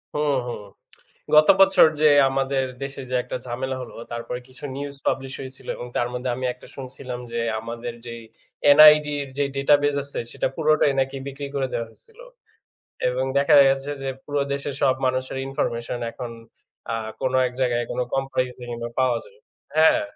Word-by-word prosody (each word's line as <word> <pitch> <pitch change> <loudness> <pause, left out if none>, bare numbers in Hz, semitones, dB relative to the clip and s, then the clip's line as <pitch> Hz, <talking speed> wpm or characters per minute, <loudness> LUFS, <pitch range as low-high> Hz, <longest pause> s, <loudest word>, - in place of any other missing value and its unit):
হুম, 150 -2 +1
হুম। 120 -3 -5 0.7
গত 155 +3 +7
বছর 195 -3 +7
যে, 155 - +5 0.2
আমাদের 135 0 0 0.2
দেশে 135 0 -5
যে, - - -2
একটা - - -5
ঝামেলা 130 +2 -3
হলো 120 - -10 0.2
তারপরে 120 +1 -4
কিছু 130 +3 -14
নিউজ 140 0 -5
পাবলিশ 135 0 -1
হইছিল। 130 -1 -10
এবং 120 - -7
তার 120 - +1
মধ্যে 125 +1 -3
আমি 130 - -5
একটা 125 - -16
শুনছিলাম 130 -1 -7
যে, 120 - -2 0.2
আমাদের 115 +1 -6
যেই 115 0 -7 0.6
NID 150 0 +9 0.2
র - - -13
যেই 140 -1 +1
database 145 +1 +3
আছে 140 - -8
সেটা - - -1
পুরোটাই 155 -3 +3
নাকি 135 +1 -2
বিক্রি 140 +1 -6
করে 135 -1 0
দেওয়া 115 -1 -2
হইছিল। 455 - -22 0.9
এবং 130 +1 -1
দেখা 140 +2 +4
গেছে 135 +1 0
যে, 135 - -3 0.2
পুরো 145 -1 -1
দেশের 140 0 -3
সব 130 -2 +4
মানুষের 130 +1 -1
information 120 -2 -2
এখন 120 -1 -7 0.6
আ - - 0 0.3
কোন 130 - 0 0.2
এক - - -13
জায়গায় 120 -2 +1
কোন - - -4 0.2
company 135 -1 0
কাছে 125 0 -13
কিংবা 120 0 -4
পাওয়া 125 -3 +2
যায়। 100 +1 -20 0.4
হ্যাঁ। 160 - +5
135 Hz, 175 wpm, -23 LUFS, 125-140 Hz, 0.9 s, NID